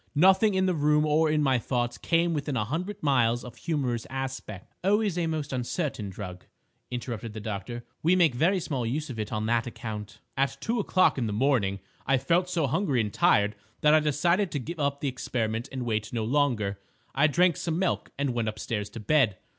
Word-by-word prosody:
Nothing 190 +6 +5
in 190 0 +2
the 185 - +2
room 150 -1 +3
or 155 +1 +3
in 150 0 +2
my 130 -3 +3
thoughts 120 0 -2
came 170 0 +2
within 145 -3 -2
a 105 - 0
hundred 180 - -4
miles 120 -4 +2
of 125 - -9
a - - -20
humorous 130 -8 -2
aspect." 130 -7 -6
"Always 205 -1 +2
a 175 -2 0
most 155 -3 -3
uncertain 125 - -2
drug," 90 -2 -8 0.5
interrupted 120 -3 -5
the 110 - -6
doctor. 110 +3 -5 0.2
"We 170 +3 +4
make 170 -7 +4
very 170 +10 +2
small 145 -7 -2
use 140 +5 -2
of 115 - -7
it 105 - -3
on 110 0 -1
that 115 +1 +1
account." 105 -3 -6 0.2
"At 135 0 0
two 230 +8 -1
o'clock 185 -7 +3
in 120 - 0
the 105 - -2
morning 105 -5 +1 0.3
I 135 0 +4
felt 170 +7 +1
so 170 -4 +1
hungry 140 -1 +1
and 105 -2 -1
tired 105 +1 +3 0.3
that 150 0 +5
I 155 - +7
decided 170 +6 +2
to 145 - 0
give 165 +6 -6
up 140 -1 0
the 145 - -1
experiment 115 -3 -2
and 130 -2 -4
wait 110 -2 -1
no 115 -2 -1
longer. 115 -6 +1 0.3
I 145 +3 +4
drank 175 +2 +3
some 165 -1 -2
milk 185 -1 0
and 140 -2 0
went 120 -2 -1
upstairs 105 -1 -4
to 110 - -8
bed. 110 -3 +2
135 Hz, 210 wpm, -27 LUFS, 115-160 Hz, 0.5 s, I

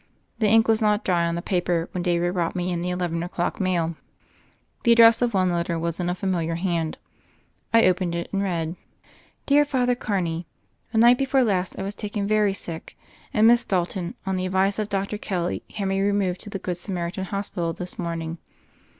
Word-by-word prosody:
The 215 - +3
ink 225 +1 +5
was 225 0 +3
not 210 0 +2
dry 170 -2 +2
on 170 - -1
the 170 - -4
paper 175 -2 0
when 180 - -3
David 175 0 +1
brought 175 -2 -1
me 180 0 -1
in 170 -1 -2
the 180 - -2
eleven 175 -2 -2
o'clock 175 0 -2
mail. 175 -4 0 0.9
The 235 - +5
address 230 0 +7
of 240 -3 +1
one 185 -1 +3
letter 170 -1 -1
was 165 +1 -2
in 175 -1 -1
a 180 - -1
familiar 175 -3 -1
hand. 170 -3 -1 0.7
I 230 0 +5
opened 180 -1 +1
it, 170 - -3
and 195 - +1
read: 170 -4 -2 0.7
"Dear 290 +1 +5
Father 255 -4 +1
Carney: 175 -8 -2 0.4
The 225 - -2
night 240 +2 +6
before 270 -1 +3
last 190 -5 0
I - - -3
was 200 +1 -3
taken 205 0 -4
very 210 -1 +2
sick, 165 -4 -7 0.3
and 215 - +3
Miss 240 +1 +5
Dalton, 180 -1 -1
on 190 -1 -1
the 185 0 -1
advice 190 +2 +1
of 210 -1 -2
Dr. 200 +1 -2
Kelly, 180 -5 -2
had 200 -2 -2
me 195 0 0
removed 195 -2 0
to 210 - -9
the 200 - -4
Good 180 -2 -4
Samaritan 180 0 -3
Hospital 190 -3 -2
this 180 +2 -7
morning. 165 -1 -4
185 Hz, 200 wpm, -24 LUFS, 170-205 Hz, 0.9 s, address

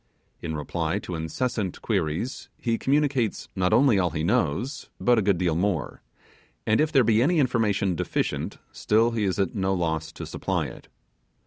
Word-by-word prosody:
In 80 -2 -4
reply 80 +4 -2
to 95 -3 -6
incessant 95 +5 -2
queries, 95 - -2
he 115 -2 -1
communicates 135 -5 0
not 90 -1 +1
only 125 -6 +5
all 90 -2 +2
he 80 -1 -3
knows 85 - 0
but 120 -2 +4
a - - +2
good 100 -2 +2
deal 85 -2 +1
more, 90 -4 -1 0.6
and 110 +6 +3
if 155 0 +1
there 135 - +5
be 110 0 +3
any 165 +7 +3
information 110 -8 +2
deficient 85 - -2
still 115 +2 +2
he 110 -3 0
is 95 - 0
at 95 -3 0
no 95 -1 0
loss 80 -2 -1
to - - -7
supply - - -2
it. - - -10
100 Hz, 175 wpm, -25 LUFS, 85-120 Hz, 0.6 s, only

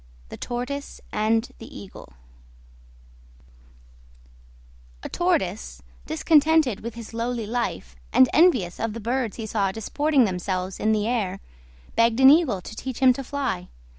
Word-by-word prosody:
THE - - -8
TORTOISE 250 +4 -5
AND 220 +2 0
THE 225 - -10
EAGLE 190 - -12 2.9
A - - -5
Tortoise, 195 - -1 0.2
discontented 300 - +3
with 235 0 -7
his 230 -1 -9
lowly 230 0 -2
life, 225 - -3 0.2
and 130 - +6
envious 255 - +3
of 225 -1 -2
the 230 - -6
birds 235 0 -2
he 225 - -5
saw 200 -3 0
disporting 280 +7 +1
themselves 185 -1 -2
in 215 - +1
the 210 -1 +1
air, 200 -6 -1 0.6
begged 230 +1 +3
an 265 0 +9
Eagle 285 - +3
to 220 - -10
teach 260 +1 -6
him 260 -1 +5
to 275 - -6
fly. 255 -10 -3
230 Hz, 135 wpm, -24 LUFS, 200-265 Hz, 2.9 s, an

